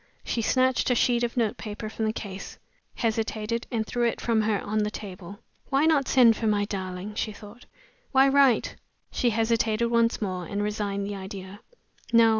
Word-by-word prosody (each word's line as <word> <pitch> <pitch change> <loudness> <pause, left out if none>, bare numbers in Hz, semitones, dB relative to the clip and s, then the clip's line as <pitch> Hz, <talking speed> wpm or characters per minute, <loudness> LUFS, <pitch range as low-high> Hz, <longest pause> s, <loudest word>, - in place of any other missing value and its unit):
She 235 - -1
snatched 255 +3 +2
a 250 - +3
sheet 240 0 +2
of 240 +1 -2
notepaper 215 -1 -2
from 220 +1 -3
the 215 - +1
case; 200 -3 -7 0.4
hesitated, 225 0 -2
and 225 -3 -1
threw 240 +2 0
it 230 - -2
from 230 -2 +1
her 210 -2 +1
on 215 +1 -2
the 210 0 +1
table. 195 -2 -8 0.3
"Why 275 +2 +3
not 300 -4 +3
send 240 -4 +6
for 225 - -2
my 205 -1 +2
darling?" 190 0 -5
she 215 0 -2
thought. 210 +3 -13 0.4
"Why 270 0 +5
write?" 275 -3 +3 0.3
She 245 - +1
hesitated 225 0 +1
once 230 -1 +2
more, 185 -4 -3
and 205 +3 -2
resigned 205 -1 -2
the 205 - -4
idea. 190 0 -8 0.5
"No! 230 -1 +6
220 Hz, 180 wpm, -26 LUFS, 205-235 Hz, 0.5 s, send